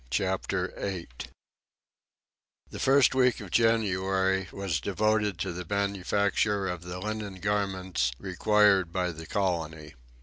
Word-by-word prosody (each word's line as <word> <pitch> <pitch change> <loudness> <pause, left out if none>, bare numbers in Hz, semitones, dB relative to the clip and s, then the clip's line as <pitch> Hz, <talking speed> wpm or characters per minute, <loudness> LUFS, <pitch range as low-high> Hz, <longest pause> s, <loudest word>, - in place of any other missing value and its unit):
Chapter 95 +3 -1
8 85 -11 -5 1.4
The - - -7
first 135 -1 +4
week 125 -2 +3
of 100 -4 -9
January 95 -4 +2
was 95 -6 -2
devoted 105 - +1
to 95 -2 -2
the 90 +1 -5
manufacture 100 +1 0
of 90 -2 -4
the 90 0 -7
linen 105 0 -4
garments 95 -8 -1
required 95 +1 +3
by 90 0 -1
the 80 0 -9
colony. 80 -5 -2
95 Hz, 115 wpm, -28 LUFS, 90-105 Hz, 1.4 s, first